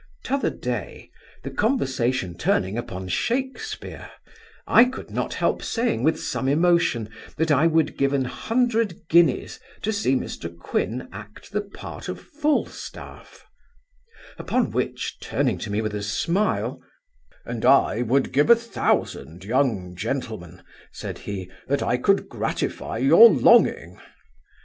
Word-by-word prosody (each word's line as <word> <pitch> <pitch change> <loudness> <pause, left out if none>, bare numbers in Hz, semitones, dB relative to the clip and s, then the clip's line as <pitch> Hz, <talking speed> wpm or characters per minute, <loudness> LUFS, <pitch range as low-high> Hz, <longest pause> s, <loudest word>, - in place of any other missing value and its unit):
T'other 275 +1 0
day, 120 -7 -5 0.3
the 135 - -5
conversation 130 - 0
turning 95 +2 0
upon 95 -6 -5
Shakespeare, 265 - -3 0.6
I 230 - +7
could 255 +1 -7
not - - -2
help - - 0
saying, 230 - -1
with 155 +5 +2
some 135 - -3
emotion, 155 -6 +2 0.3
that 160 0 +1
I 145 +3 +4
would 160 -1 +1
give 140 0 +2
an 135 -2 +1
hundred 225 - -1
guineas 165 -5 +3 0.2
to 220 - 0
see 200 -11 +1
Mr 85 -8 -5
Quin 120 +8 -2
act 105 +2 -11
the 210 +1 0
part 200 -1 -9
of - - -5
Falstaff; 300 -1 -4 0.9
upon - - 0
which, - - -3
turning - - -1
to 115 - -5
me 105 +2 -1
with 110 -1 -3
a 105 - -3
smile, 170 - -1 0.6
'And - - -5
I - - +4
would 130 +3 +1
give 145 +3 +2
a 235 - +10
thousand, 95 - -2
young 110 -7 0
gentleman 90 - -5 0.3
(said - - -7
he) 95 -3 -4 0.2
that 140 +1 0
I 125 - +1
could 195 +10 +2
gratify - - -3
your 465 - +8
longing. - - +4
140 Hz, 135 wpm, -24 LUFS, -, 0.9 s, a